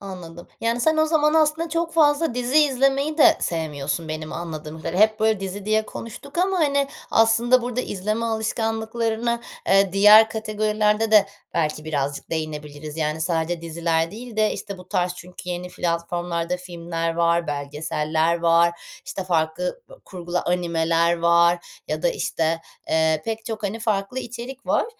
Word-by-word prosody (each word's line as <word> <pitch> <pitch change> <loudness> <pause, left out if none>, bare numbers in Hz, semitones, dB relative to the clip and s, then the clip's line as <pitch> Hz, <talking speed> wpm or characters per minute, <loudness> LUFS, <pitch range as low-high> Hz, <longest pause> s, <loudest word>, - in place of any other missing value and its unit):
Anladım. 175 -3 -9
Yani, 230 +1 0
sen 315 +4 +3
o 315 0 +3
zaman 305 -1 +2
aslında 315 +1 +2
çok 335 +1 -1
fazla 300 -3 +3
dizi 250 +4 +2
izlemeyi 275 +2 +2
de 320 +2 +7
sevmiyorsun 155 -1 -3
benim 155 0 -5
anladığım 160 -2 -6
kadarıyla. 170 +4 -2
Hep, 215 0 -16
böyle, 220 -2 +2
dizi 195 +1 -5
diye 215 0 +1
konuştuk 280 +7 -8
ama, 375 +1 +2
hani, 280 -3 +2 0.2
aslında 235 +2 +4
burada 245 +1 -2
izleme 215 +2 -2
alışkanlıklarını, 225 +1 -1 0.3
eee, 195 -1 +4
diğer 210 +2 +8
kategorilerde 215 0 0
de 210 -2 +6 0.3
belki 155 -1 -1
birazcık 145 -2 -3
değinebiliriz. 150 -1 -5
Yani, 155 0 -1
sadece 165 0 -1
diziler 165 0 -1
değil 230 +1 -9
de, 215 0 +2
işte, 200 -2 -7
bu 180 0 -13
tarz 180 -2 0
çünkü 180 0 -11
yeni 180 0 -4
platformlarda 170 0 -2
filmler 170 -2 -4
var, 170 0 +2
belgeseller 150 +3 -1
var, 170 0 +4 0.3
işte, 190 - -5
farklı 170 - -1
bö - - -13
kurgulu 175 -1 -4
animeler 170 -1 +1
var 170 +1 +3 0.2
ya 155 0 -3
da, 175 - +3
işte, 165 0 -1 0.3
eee, 160 -1 +2
pek 225 0 -4
çok, 220 -2 -5
hani, 205 +2 -2
farklı 215 +2 -1
içerik 250 +2 -7
var. - - +2
185 Hz, 155 wpm, -23 LUFS, 165-230 Hz, 0.3 s, diğer